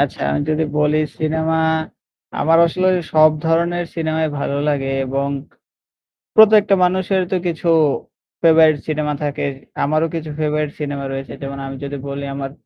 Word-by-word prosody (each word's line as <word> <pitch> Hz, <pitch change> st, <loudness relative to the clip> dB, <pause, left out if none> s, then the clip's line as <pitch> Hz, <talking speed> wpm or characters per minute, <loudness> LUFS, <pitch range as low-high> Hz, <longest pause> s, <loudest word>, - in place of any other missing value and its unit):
আচ্ছা -, -, -1 dB
আমি -, -, 0 dB
যদি 155 Hz, +1 st, +1 dB
বলি 150 Hz, +1 st, +2 dB, 0.2 s
সিনেমা 160 Hz, +1 st, 0 dB, 0.8 s
আমার 165 Hz, +2 st, +4 dB
আসলে 185 Hz, +3 st, 0 dB, 0.2 s
সব 155 Hz, 0 st, +6 dB, 0.2 s
ধরনের 170 Hz, +2 st, +1 dB
সিনেমাই 160 Hz, -1 st, -1 dB
ভালো 140 Hz, 0 st, -2 dB
লাগে, 135 Hz, -2 st, -1 dB, 0.2 s
এবং 140 Hz, +2 st, -1 dB, 1.1 s
প্রত্যেকটা 215 Hz, -2 st, +6 dB
মানুষের 185 Hz, +1 st, +1 dB
তো -, -, +1 dB
কিছু 170 Hz, 0 st, -3 dB, 0.7 s
ফেভারিট 160 Hz, -2 st, +5 dB
সিনেমা 150 Hz, -1 st, -1 dB
থাকে। 145 Hz, -1 st, -2 dB, 0.4 s
আমারও 155 Hz, +3 st, +1 dB
কিছু 160 Hz, -1 st, -5 dB
ফেভারাইট 150 Hz, -1 st, -1 dB
সিনেমা 140 Hz, -2 st, -4 dB
রয়েছে। 135 Hz, 0 st, -6 dB
যেমন 140 Hz, 0 st, -6 dB
আমি 135 Hz, 0 st, -6 dB
যদি 140 Hz, 0 st, -5 dB
বলি 140 Hz, 0 st, -5 dB
আমার 135 Hz, -1 st, -5 dB
155 Hz, 140 wpm, -19 LUFS, 145-165 Hz, 1.1 s, সব